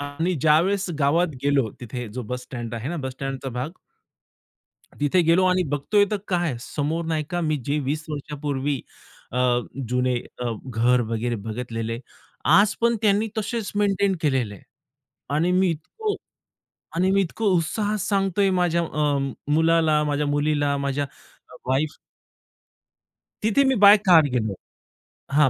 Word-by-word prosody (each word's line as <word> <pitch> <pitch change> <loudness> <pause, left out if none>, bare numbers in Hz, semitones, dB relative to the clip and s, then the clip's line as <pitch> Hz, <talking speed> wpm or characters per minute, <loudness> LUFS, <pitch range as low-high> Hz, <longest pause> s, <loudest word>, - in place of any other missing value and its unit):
आणि 150 +6 -2
ज्यावेळेस 180 +6 +3
गावात 160 +5 +3 0.2
गेलो 140 -5 +2
तिथे 120 0 -6
जो 125 - -3
बस 125 +3 -5
स्टँड 120 -3 -6
आहे 115 +5 -4
ना 175 - -3
बस 130 - -3
स्टँडचा 135 0 -5
भाग 125 +5 -3 1.3
तिथे 145 +5 +3
गेलो 170 +3 +4
आणि 185 0 +3
बघतोय 200 +9 +2
तर 210 - +1
काय 175 -8 0
समोर 155 +5 -2
नाही 155 -2 -1
का 175 0 -1
मी 155 -2 0
जे 145 +2 +1
20 150 +3 -2
वर्षांपूर्वी 145 -2 -3 0.5
अ, 125 0 +2 0.3
जुने 125 0 +1 0.2
अ, 120 -1 -1
घर 125 +1 +2
वगैरे 120 +1 -1
बघितलेले. 115 0 -4 0.5
आज 205 +1 +5
पण 235 0 +3
त्यांनी 210 +1 +3
तसेच 220 0 -2
मेंटेन 200 -1 +2
केलेले 130 - 0
आहे. - - -15 0.7
आणि 165 +4 +2
मी 185 -1 +3
इतकं 410 - -3 0.8
आणि 185 +2 +2
मी 195 0 +3
इतकं 195 +5 -4
उत्साहात 205 +6 -1
सांगतोय 195 0 +1
माझ्या 175 -2 +2
अ, 150 -3 0 0.3
मुलाला, 160 -1 +3
माझ्या 145 0 0
मुलीला, 145 0 +1
माझ्या 140 0 -1 0.4
अ, - - -15 0.2
वाईफ 145 +3 0 1.5
तिथे 220 +6 +3
मी 265 -1 +3
बाय 205 +1 +10
कार 170 -4 +8
गेलो 110 -5 0 0.8
हां, 145 -1 +5
150 Hz, 145 wpm, -24 LUFS, 130-185 Hz, 1.5 s, बाय